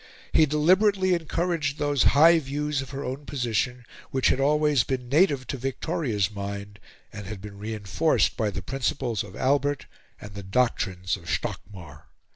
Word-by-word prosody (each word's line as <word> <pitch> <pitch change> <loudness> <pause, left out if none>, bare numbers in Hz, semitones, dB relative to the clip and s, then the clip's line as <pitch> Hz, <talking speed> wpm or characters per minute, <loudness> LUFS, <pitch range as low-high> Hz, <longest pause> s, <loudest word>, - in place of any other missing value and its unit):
He 155 -1 +5
deliberately 185 +6 +3
encouraged 165 -3 -1
those 145 -3 0 0.2
high 165 +3 +7
views 145 0 -2
of 135 - -8
her 140 0 -5
own 135 +3 -5
position 125 -1 -1 0.2
which 130 -1 +2
had 130 - +1
always 150 -1 +3
been 130 -2 -3
native 140 -3 +3
to 135 - -4
Victoria's 130 - -1
mind 100 0 -6 0.3
and 100 -2 -8
had 105 -1 -6
been 100 0 -10
reinforced 105 - 0
by 110 -3 0
the 100 -2 -5
principles 125 -1 -2
of 105 -1 -11
Albert 140 +2 +1 0.3
and 105 -1 -10
the 100 - -7
doctrines 95 -4 0
of - - -11
Stockmar. 85 -8 -5
130 Hz, 155 wpm, -26 LUFS, 105-150 Hz, 0.3 s, high